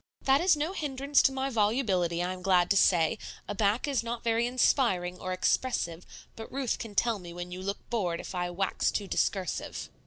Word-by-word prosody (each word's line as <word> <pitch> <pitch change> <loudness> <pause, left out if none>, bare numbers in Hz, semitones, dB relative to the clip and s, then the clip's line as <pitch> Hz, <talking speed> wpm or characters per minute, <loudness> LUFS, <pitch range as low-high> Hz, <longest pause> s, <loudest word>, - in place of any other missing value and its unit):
"That 270 +2 +4
is 355 -3 +4
no 310 +5 -2
hindrance 280 -3 +1
to - - +3
my 265 0 -2
volubility, 205 -7 +1
I 180 +1 -2
am 185 - -9
glad 180 -1 +3
to - - +4
say; 180 +2 +3 0.3
a - - -3
back 205 +5 +1
is 275 -3 +1
not 235 0 -5
very 230 +1 +1
inspiring 195 -8 +1
or 185 - -4
expressive, 185 -3 -1 0.3
but 225 - -9
Ruth 265 -3 -2
can 215 -3 -7
tell 230 0 +2
me 175 -2 -9
when 175 0 -7
you 180 +1 -6
look 200 +2 -5
bored 180 -8 -1
if - - -7
I 175 -1 -2
wax 190 +2 0
too 205 - -2
discursive." 190 -2 -2
205 Hz, 205 wpm, -29 LUFS, 180-255 Hz, 0.3 s, That